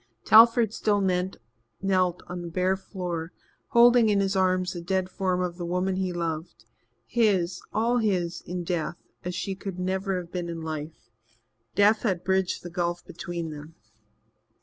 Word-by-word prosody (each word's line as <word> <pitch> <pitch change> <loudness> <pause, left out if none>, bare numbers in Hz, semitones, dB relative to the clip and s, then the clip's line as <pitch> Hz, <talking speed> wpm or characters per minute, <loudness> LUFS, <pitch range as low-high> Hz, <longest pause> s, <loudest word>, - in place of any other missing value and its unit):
Telford 230 0 +7
still 210 -2 +1
knelt 180 - -1
on 175 0 -6
the 175 - -6
bare 185 +2 +1
floor, 175 -4 -5 0.3
holding 235 -1 +6
in 205 -1 +3
his 195 0 0
arms 185 -1 +2
the 175 - -6
dead 185 +1 -1
form 185 -1 -1
of 175 -1 -3
the 175 - -5
woman 185 +2 0
he 190 -1 -1
loved 160 -9 -4 0.4
his, 190 -7 +1
all 235 +3 +2
his, 180 -6 0
in 180 0 -3
death, 170 -1 -2 0.3
as 180 0 -4
she 195 - -2
could 190 -1 -6
never 190 +1 -1
have 175 -1 -9
been 175 -2 -3
in 165 -1 -5
life. 155 -4 -6 0.6
Death 210 +2 +4
had 190 -7 -1
bridged 190 -1 0
the 175 - -6
gulf 175 -1 -2
between 175 -2 -5
them. 150 +2 -10
180 Hz, 160 wpm, -26 LUFS, 170-195 Hz, 0.6 s, Telford